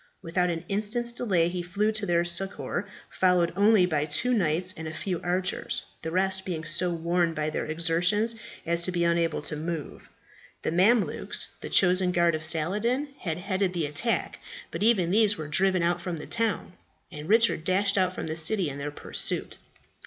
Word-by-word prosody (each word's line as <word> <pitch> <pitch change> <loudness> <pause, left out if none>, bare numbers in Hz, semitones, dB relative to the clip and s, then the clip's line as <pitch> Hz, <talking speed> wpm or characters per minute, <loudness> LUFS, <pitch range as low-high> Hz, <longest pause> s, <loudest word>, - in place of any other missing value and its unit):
Without 180 +1 0
an 165 0 -4
instant's 215 +4 -1
delay 195 -9 +1
he 175 +1 -3
flew 200 +5 0
to 215 -2 -1
their 170 0 +2
succour, 185 +2 -2 0.2
followed 180 -2 +2
only 205 -1 +5
by 155 -4 0
two 205 +12 +2
knights 180 -3 +1
and 160 0 -6
a 155 - -6
few 180 -4 -3
archers, 180 +1 -2 0.2
the 160 - -4
rest 190 +2 0
being 165 -4 -4
so 170 +4 0
worn 170 0 0
by 155 0 -1
their - - -3
exertions 170 +8 +1 0.3
as 170 +1 +1
to 185 - +1
be 175 -1 0
unable 170 -2 +1
to 150 - -3
move. 160 0 -6 0.5
The - - -1
Mamelukes, 200 +6 +2
the - - -6
chosen 180 -1 +3
guard 170 -1 +3
of 155 0 -3
Saladin, 210 - 0
had 160 -3 -3
headed 190 0 -1
the 170 -3 -1
attack; 150 +11 -1 0.3
but - - -5
even 200 -6 +3
these 210 0 +4
were 155 -1 -5
driven 185 +3 +2
out 175 +1 +1
from 175 -1 -4
the 150 - -8
town, 225 -5 0 0.4
and 150 0 -8
Richard 225 -6 +4
dashed 195 +3 +2
out 185 -2 +2
from - - -6
the 160 0 -4
city 175 +1 +1
in 140 - -7
their 145 +1 -3
pursuit. 145 - -3
180 Hz, 185 wpm, -27 LUFS, 165-200 Hz, 0.5 s, only